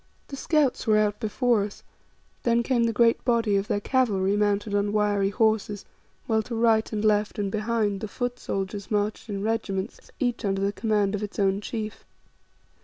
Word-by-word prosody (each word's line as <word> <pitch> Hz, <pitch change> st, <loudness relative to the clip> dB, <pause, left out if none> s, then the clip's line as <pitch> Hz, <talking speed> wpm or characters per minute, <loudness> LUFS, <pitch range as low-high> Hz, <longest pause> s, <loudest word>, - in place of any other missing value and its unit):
The 275 Hz, -, -6 dB
scouts 285 Hz, -3 st, +1 dB
were 215 Hz, -1 st, +5 dB
out 210 Hz, -1 st, +1 dB
before 235 Hz, 0 st, +1 dB
us, 205 Hz, 0 st, -8 dB, 0.6 s
then 235 Hz, 0 st, +2 dB
came 240 Hz, -2 st, +2 dB
the 230 Hz, -, +1 dB
great 230 Hz, +1 st, +3 dB
body 230 Hz, -4 st, +2 dB
of 195 Hz, +1 st, 0 dB
their 205 Hz, -, 0 dB
cavalry 205 Hz, -5 st, +1 dB
mounted 205 Hz, 0 st, 0 dB
on 205 Hz, 0 st, +1 dB
wiry 205 Hz, -2 st, +2 dB
horses, 215 Hz, -2 st, 0 dB, 0.4 s
while 220 Hz, -1 st, +1 dB
to 230 Hz, +2 st, -6 dB
right 225 Hz, -1 st, +2 dB
and 215 Hz, -1 st, -2 dB
left 210 Hz, 0 st, +2 dB
and 200 Hz, -2 st, -1 dB
behind, 215 Hz, -2 st, 0 dB
the 215 Hz, -, -3 dB
foot 245 Hz, +3 st, -4 dB
soldiers 195 Hz, +1 st, -4 dB
marched 210 Hz, +1 st, -1 dB
in 200 Hz, -1 st, -3 dB
regiments, 215 Hz, -2 st, -3 dB
each 245 Hz, -2 st, -1 dB
under 195 Hz, -1 st, 0 dB
the 200 Hz, +1 st, 0 dB
command 210 Hz, -3 st, 0 dB
of 210 Hz, -, -2 dB
its 210 Hz, -1 st, -6 dB
own 195 Hz, 0 st, +1 dB
chief. 215 Hz, 0 st, -5 dB
210 Hz, 180 wpm, -26 LUFS, 205-230 Hz, 0.6 s, were